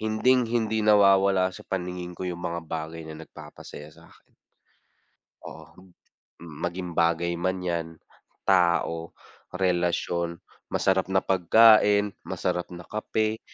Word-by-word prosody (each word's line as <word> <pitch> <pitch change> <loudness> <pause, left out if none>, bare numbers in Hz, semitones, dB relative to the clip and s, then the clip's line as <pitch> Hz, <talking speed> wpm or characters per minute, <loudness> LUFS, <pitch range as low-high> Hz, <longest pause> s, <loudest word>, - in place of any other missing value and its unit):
hinding 115 +3 +2
hindi 110 -2 0
nawawala 100 -2 +4
sa - - -11
paningin 90 -1 -5
ko 95 - -5
yung 90 -1 -5
mga 85 -1 -3
bagay 80 +1 -5
na 80 -1 -9
nagpapasaya 75 -1 -12
sakin. - - -20 1.2
Oo. 90 0 -13 0.5
Mm, 80 -3 -11
maging 90 0 -4
bagay 85 +1 +1
man 95 +2 -2
yan, 85 -2 -2 0.6
tao, 85 -3 +2 0.4
relasyon, 85 -2 -1 0.4
masarap 95 -1 +1
na 95 - +3
pagkain, 105 +2 +5
masarap 90 - -3
na 85 0 -9
kape, 110 0 -2
90 Hz, 115 wpm, -26 LUFS, 85-100 Hz, 1.2 s, pagkain